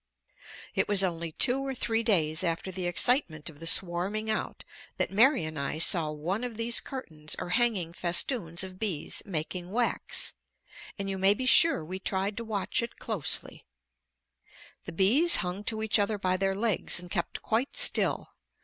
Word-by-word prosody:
It - - 0
was 200 -2 +5
only 170 -3 -3
two 255 - +2
or 270 -1 -4
three 225 -2 -1
days 170 -6 +1
after 170 +2 -2
the 185 -1 -4
excitement 175 - +1
of 145 - -19
the 165 - -5
swarming 190 +6 0
out 215 - -4 0.3
that - - -1
Mary 245 - +4
and 155 -1 -6
I 140 +2 -3
saw 165 -1 +4
one 170 +9 -4
of 240 -3 -6
these 230 0 +2
curtains 160 - -7
or - - -6
hanging 205 -6 +1
festoons 175 0 0
of 185 0 -10
bees 190 -9 -2
making 175 0 -4
wax, 235 +4 0 0.6
and 200 -1 -4
you 195 -1 -4
may 195 +2 +4
be 255 - -5
sure 325 - +6
we 185 +4 -6
tried 195 +1 -3
to 230 - -4
watch 215 -2 -2
it 235 - -7
closely. 210 -10 -2 1.2
The - - -6
bees 245 - +5
hung 180 +3 -1
to 220 -1 -1
each 220 0 +2
other 205 +1 0
by 185 -2 -1
their 195 +1 -1
legs 210 -4 0
and 175 0 -10
kept 175 - -3
quite 235 - -1
still. - - +2
195 Hz, 175 wpm, -28 LUFS, 170-225 Hz, 1.2 s, sure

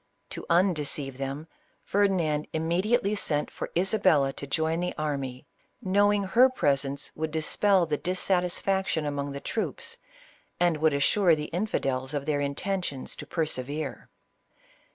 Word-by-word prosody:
To - - -4
undeceive 150 -6 +1
them, 140 +3 -4 0.4
Ferdi 200 0 +3
nand 155 -4 0
immediately 190 +7 +1
sent 150 -7 -1
for - - -5
Isabella 160 -8 +3
to 140 - -7
join 160 +3 0
the 180 0 -2
army, 140 -4 -3 0.3
knowing 205 +2 +2
her 240 +7 +5
presence 140 - 0
would 160 0 -3
dispel 175 +4 +2
the 150 -2 -2
dissatisfaction 185 -1 0
among 145 -1 -2
the 140 - -5
troops, 220 - -4 0.6
and 175 -3 +3
would 155 -1 +2
assure 170 +4 +4
the 150 0 -6
infidels 135 -8 -1
of 140 -1 -2
their 150 -1 0
intentions 145 0 -1
to - - -8
persevere. 155 -2 -3
160 Hz, 135 wpm, -27 LUFS, 140-185 Hz, 0.6 s, her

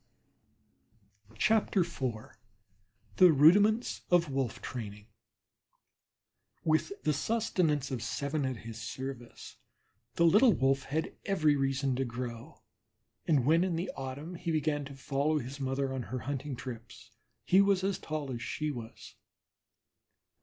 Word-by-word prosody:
IV 215 - +2 1.5
THE 180 -2 +8
RUDIMENTS 205 - +4
OF 170 -4 +3
WOLF 135 -4 -2
TRAINING 105 -4 -7 1.6
With 155 - +1
the 150 - +2
sustenance 155 - 0
of 125 -3 -3
seven 140 +5 -2
at 130 -2 -2
his 115 0 -7
service 125 +1 -7 0.6
the 170 - +3
little 210 +8 +6
Wolf 135 -2 +1
had 155 +3 -3
every 155 -8 +3
reason 135 -1 0
to 135 - +1
grow, 120 -1 -7 0.6
and 145 -7 +3
when 165 +4 +4
in 185 -3 0
the 170 +3 -3
autumn 135 +6 -6
he 175 0 -5
began 155 -2 0
to 140 0 -9
follow 140 +3 0
his 135 +1 -6
mother 135 0 -1
on 130 - -3
her 130 - -3
hunting 140 0 -4
trips 120 -2 -9 0.3
he 190 +2 +5
was 200 -2 +2
as 195 -1 0
tall 155 -3 -4
as 120 -2 -5
she 150 +3 -2
was. 115 -4 -9
140 Hz, 130 wpm, -31 LUFS, 130-165 Hz, 1.6 s, THE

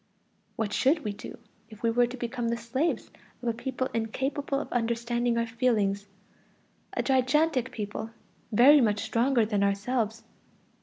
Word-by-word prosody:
What 210 -2 -2
should 295 +8 +2
we 210 -2 -2
do 205 - -9 0.3
if 215 0 -14
we 230 - +3
were 240 +1 +3
to 250 +2 -7
become 240 0 -3
the 235 - 0
slaves 260 +8 -2 0.3
of 240 - 0
a - - +1
people 255 +2 -3
incapable 270 +5 -1
of - - -6
understanding 235 0 0
our 230 - +1
feelings, 220 -4 0 0.9
a - - -1
gigantic 265 0 +2
people, 210 +1 -5 0.4
very 270 +7 +7
much 210 -3 +2
stronger 235 +2 +2
than 210 -2 0
ourselves? 215 +3 0
235 Hz, 150 wpm, -28 LUFS, 220-255 Hz, 0.9 s, very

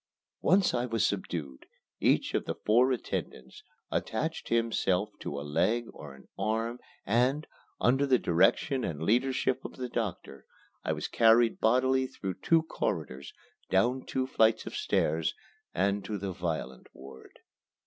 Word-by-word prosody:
Once 185 +3 +3
I 125 0 0
was 115 -2 +1
subdued, 80 -9 -4 0.3
each - - +2
of - - 0
the - - -3
four 120 +5 +3
attendants 65 - -4 0.3
attached 160 +9 -2
himself 110 -4 +1
to 70 - -5
a 70 - -6
leg 115 +11 +1
or 70 -2 -10
an 70 - -18
arm 115 +2 -1 0.3
and, 125 +7 +2 0.3
under 135 +3 +3
the 130 -2 +5
direction 115 - +2
and 80 -1 -3
leadership 125 +5 +1
of - - -8
the 125 -1 -4
doctor, 100 - -5 0.4
I - - -1
was - - -3
carried 115 0 +4
bodily 130 +3 +3
through 95 -7 -6
two 165 -1 +3
corridors, 75 - -4 0.4
down 120 +7 +2
two 130 0 -1
flights 110 -3 +2
of - - -7
stairs, 340 - 0 0.4
and 100 0 0
to 105 0 -3
the 100 0 -4
violent 80 -7 -4
ward. 65 0 -13
115 Hz, 145 wpm, -29 LUFS, 90-130 Hz, 0.4 s, the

